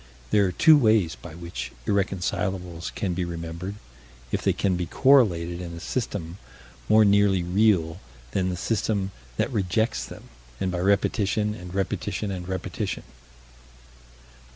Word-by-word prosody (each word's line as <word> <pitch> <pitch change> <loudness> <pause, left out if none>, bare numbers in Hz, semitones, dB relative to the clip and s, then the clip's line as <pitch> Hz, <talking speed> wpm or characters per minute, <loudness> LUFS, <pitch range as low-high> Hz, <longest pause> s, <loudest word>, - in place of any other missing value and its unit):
There 105 -2 +4
are - - -1
two 155 - +6
ways 110 - +3
by 80 0 -11
which 85 +1 -6
irreconcilables 95 -3 -1
can 95 -3 -1
be 90 +1 -1
remembered 85 +3 -5 0.6
if - - 0
they - - +2
can 95 -2 0
be 90 -1 -2
correlated 90 - +3
in 85 -1 -6
a - - -7
system 95 -4 -4 0.5
more 110 0 +6
nearly 100 -2 +4
real 90 -3 +2 0.3
than 95 -1 0
the 90 - -3
system 100 0 -1 0.3
that - - 0
rejects 110 +2 0
them - - -10 0.4
and 95 -1 -1
by 90 - -2
repetition 100 +2 +1
and 90 -3 -9
repetition 100 +1 -2
and 90 -2 -5
repetition. 95 -1 -3
95 Hz, 140 wpm, -25 LUFS, 85-105 Hz, 0.6 s, two